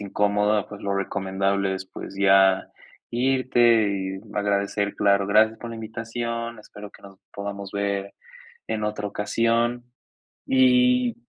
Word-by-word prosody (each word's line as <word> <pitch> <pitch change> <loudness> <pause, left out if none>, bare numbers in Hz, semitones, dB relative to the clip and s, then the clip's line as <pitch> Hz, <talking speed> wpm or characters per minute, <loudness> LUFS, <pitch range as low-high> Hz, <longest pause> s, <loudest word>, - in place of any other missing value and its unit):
incómoda, 105 +1 0
pues 105 - -10
lo 100 0 -1
recomendable 100 0 -1
es 95 0 -6
pues, 100 - -9
ya 95 -1 +4 0.4
irte 120 -3 +3
y 95 -1 -4
agradecer, 100 0 -1
claro, 100 -1 +2
gracias 110 +2 +3
por 120 - -7
la 115 - -7
invitación, 115 +1 -5
espero 105 -1 -11
que - - -19
nos 95 -1 -14
podamos 100 -1 -6
ver 100 -1 -2 0.6
en 110 -1 -2
otra 105 -1 -3
ocasión. 115 +4 0 0.6
Y 250 -2 +4
105 Hz, 130 wpm, -24 LUFS, 100-115 Hz, 0.6 s, ya